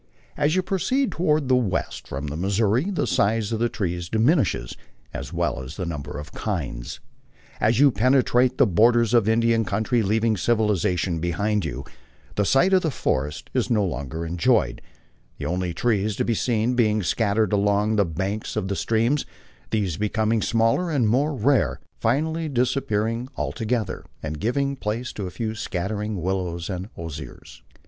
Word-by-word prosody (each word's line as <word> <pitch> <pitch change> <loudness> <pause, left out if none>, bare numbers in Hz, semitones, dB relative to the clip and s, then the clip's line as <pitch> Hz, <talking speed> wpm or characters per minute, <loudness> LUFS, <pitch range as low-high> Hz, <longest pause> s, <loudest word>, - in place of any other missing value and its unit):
As 150 +3 +1
you 185 - +2
proceed 255 +9 0
toward 155 -4 +1
the 130 - +4
west 115 -7 -1
from 70 +2 -5
the 75 0 -4
Missouri, 105 - +1
the 190 - 0
size 105 +2 +1
of 110 - -1
the 120 +1 +1
trees 85 -5 -3
di 110 - -1
minishes 115 - +2 0.4
as - - -6
well - - -1
as 65 +3 -9
the 90 - -3
number 75 -4 -5
of 75 0 -8
kinds. - - -4 0.6
As 115 +3 +2
you 140 -1 +6
penetrate 125 +2 +3
the - - +6
borders 115 +4 +3
of 115 -4 +5
the 110 - +3
Indian 115 0 +2
country, 110 +4 0
leaving 110 +1 +1
civilization 95 -5 +1
behind 100 +4 0
you, 70 -1 -5 0.5
the 105 - +1
sight 175 - +3
of 185 - +4
forests 75 - -1
is - - 0
no 105 -4 +2
longer 75 +1 -4
enjoyed, 85 - +1 0.6
the 75 - -5
only 90 +2 -1
trees 105 +1 0
to - - -1
be 115 - +1
seen 115 +1 +1
being 110 -4 +2
scattered 105 +3 +1
along 105 +1 +2
the 100 - +5
banks 95 +5 -3
of 95 - -2
the 100 - -1
streams, 115 +8 +1 0.5
these 100 -7 -1
becoming 110 +1 +1
smaller 115 - +2
and 135 -8 +2
more 140 +7 +2
rare, 130 +1 +2 0.2
finally 160 +7 0
disappearing 120 -3 0
altogether 110 -4 -2 0.2
and 75 -1 -4
giving 140 +5 0
place 115 0 -3
to 100 -3 -4
a - - -5
few 110 +3 -3
scattering 105 0 -3
willows 90 -1 -2
and 95 +2 -5
osiers. 80 -3 -8
110 Hz, 165 wpm, -24 LUFS, 95-120 Hz, 0.6 s, you